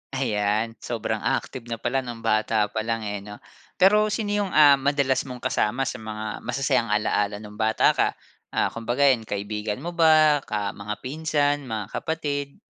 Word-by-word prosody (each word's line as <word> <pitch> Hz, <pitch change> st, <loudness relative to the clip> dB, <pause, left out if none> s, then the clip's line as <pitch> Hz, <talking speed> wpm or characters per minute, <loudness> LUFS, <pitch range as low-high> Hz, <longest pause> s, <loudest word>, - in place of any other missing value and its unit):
Ayan, 110 Hz, -3 st, 0 dB
sobrang 115 Hz, -3 st, -3 dB
active 120 Hz, -2 st, -2 dB
na 115 Hz, -, -3 dB
pala 120 Hz, +4 st, -1 dB
no'ng 120 Hz, -3 st, -7 dB
bata 110 Hz, -1 st, +1 dB
palang, 115 Hz, +1 st, -2 dB
eh, 105 Hz, -1 st, -3 dB
'no? 105 Hz, +1 st, -11 dB, 0.3 s
Pero 210 Hz, +3 st, +5 dB
sino 215 Hz, -1 st, -2 dB
'yung, 205 Hz, -2 st, 0 dB
ah, 145 Hz, -2 st, +7 dB
madalas 135 Hz, -1 st, +1 dB
mong 125 Hz, -1 st, -8 dB
kasama 120 Hz, +6 st, 0 dB
sa 130 Hz, -2 st, -4 dB
mga 110 Hz, -1 st, -5 dB
masasayang 130 Hz, -1 st, +1 dB
alaala 105 Hz, -1 st, +1 dB
no'ng 105 Hz, +1 st, -11 dB
bata 110 Hz, 0 st, +3 dB
ka, -, -, +2 dB, 0.5 s
ah, -, -, +1 dB
kumbaga, 120 Hz, +4 st, -1 dB
'yan, 125 Hz, -6 st, +3 dB
kaibigan 105 Hz, +3 st, -4 dB
mo 175 Hz, -, -3 dB
ba, 155 Hz, -3 st, +5 dB
ka 105 Hz, -1 st, -2 dB
mga 105 Hz, +1 st, -5 dB
pinsan, 145 Hz, 0 st, 0 dB
mga 110 Hz, -4 st, -4 dB
kapatid? 145 Hz, -3 st, -3 dB
120 Hz, 165 wpm, -24 LUFS, 105-145 Hz, 0.5 s, ah